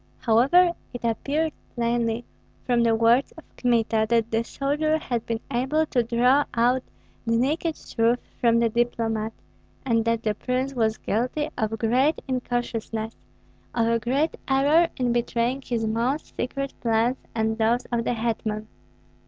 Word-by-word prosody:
However, 280 +11 +4 0.2
it 245 - -7
appeared 285 +7 0 0.2
plainly, 235 -1 0 0.4
from 240 -2 +2
the 230 -1 +3
words 230 +4 +3
of 320 - -13
Kmita, 225 -3 +1
that 230 -1 +2
the 225 +1 +1
soldier 295 +5 0
had 240 -7 -3
been 225 -1 -2
able 265 +6 +1
to 255 -5 +1
draw 245 +4 +3
out 245 +2 +3 0.5
the 230 0 +2
naked 305 +6 0
truth 230 +2 0 0.2
from 235 -1 +4
the 230 0 +3
diplomat, 225 -1 -1 0.5
and 230 -3 +2
that 230 0 0
the 215 - +1
prince 255 +5 -2
was 220 -3 +1
guilty 255 +8 -1
of 220 0 -1
great 250 +7 +2
incautiousness, 240 -3 -3 0.6
of 230 -1 +2
a 230 0 +2
great 270 +7 0
error 290 +5 +4
in 245 -2 +1
betraying 240 +2 0
his 235 -3 -2
most 235 +7 -1
secret 275 +2 -3
plans 230 +2 +2 0.2
and 220 0 0
those 235 +3 +2
of 235 -1 0
the 240 - -1
hetman. 220 -2 -2
235 Hz, 150 wpm, -25 LUFS, 230-265 Hz, 0.6 s, However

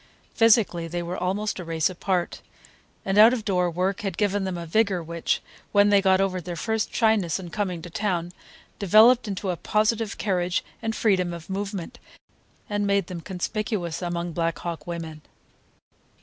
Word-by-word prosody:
Physically 215 -7 +3
they 175 +1 -3
were 175 +1 -4
almost 195 +4 -2
a - - -5
race 165 -2 0
apart, 180 -1 -2 0.6
and 195 +1 +2
out 225 +3 +8
of 225 -4 -3
door 180 -3 +1
work 185 +3 -1
had 195 -4 -4
given 205 -1 +1
them 185 -2 -3
a 170 - -6
vigor 190 0 +1
which, 170 0 -2 0.3
when 205 0 +5
they 200 -1 +5
got 190 -1 +4
over 190 -2 0
their 175 +1 -6
first 220 +4 -1
shyness 215 -7 +2
on 180 -2 -8
coming 185 -6 -3
to 175 - -8
town, 175 -3 -1 0.5
developed 220 +5 +6
into 195 -1 -2
a - - -2
positive 215 +3 0
carriage 180 -3 0 0.2
and 225 -1 -2
freedom 185 -5 +1
of 170 +2 -9
movement, 195 -2 -4 0.7
and 205 -1 -1
made 200 -2 +2
them 175 -1 -7
conspicuous 185 -2 -3
among 175 -1 -3
Black 165 -1 -1
Hawk 170 -3 -6
women. 165 -3 -6
190 Hz, 170 wpm, -25 LUFS, 175-205 Hz, 0.7 s, out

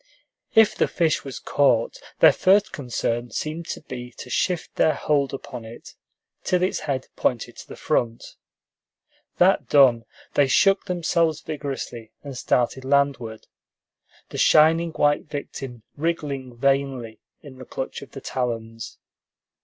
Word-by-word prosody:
If 220 -1 +6
the - - +2
fish 165 -3 0
was 135 -2 -7
caught, 120 -5 +1 0.2
their - - +8
first 200 +2 +3
concern 120 -2 -2
seemed 155 +8 -4
to - - -5
be 125 -4 -8
to 125 - -9
shift 175 +4 -1
their 155 - +3
hold 140 -2 +1
upon 125 -3 -7
it, 115 +1 -11 0.5
till 180 -1 +1
its 185 - 0
head 140 -4 -3
pointed 120 -1 -1
to - - -11
the - - -9
front. 120 -6 -2 1.0
That 185 +2 +4
done, 125 -5 +5 0.3
they 145 - +4
shook 195 +8 +3
themselves 170 -3 0
vigorously 135 -7 -6
and 140 -2 -7
started 125 +1 0
landward, 135 -5 0 0.8
the - - -6
shining 165 +2 +5
white 145 -1 +2
victim 135 -5 -7
wriggling 140 -6 -3
vainly 135 -4 0 0.2
in 135 -3 -12
the 130 - -9
clutch 130 - -5
of 140 - -12
the 135 - -8
talons. 115 -2 -4
140 Hz, 140 wpm, -24 LUFS, 120-155 Hz, 1.0 s, their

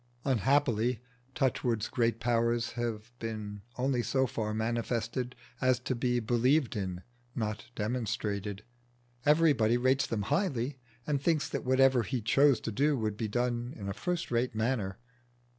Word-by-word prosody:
Unhappily, 125 -2 +2 0.4
Touchwood's 120 -4 +1
great 115 -4 0
powers 115 0 +1
have 115 -1 -4
been 105 -2 -5 0.2
only 130 -1 +1
so 130 +4 +1
far 110 -3 -2
manifested 115 +2 -2 0.3
as 130 -1 +4
to 130 - -1
be 125 0 +1
believed 120 +4 +2
in, 95 -3 -3 0.3
not 105 -2 -3
demonstrated. 105 -3 -2 0.6
Everybody 145 -7 +4
rates 130 +2 +2
them 105 -3 -1
highly, 140 - 0 0.3
and 145 -2 0
thinks 155 0 +2
that - - -3
whatever 130 -1 +4
he 125 +3 -2
chose 135 +5 +4
to 115 - -3
do 145 +6 +2
would 110 -3 -1
be 110 +1 -2
done 120 +2 -1
in 100 -3 -6
a 100 - -2
first 170 - -3
rate 120 -1 0
manner. 110 -4 -1
120 Hz, 140 wpm, -31 LUFS, 110-130 Hz, 0.6 s, as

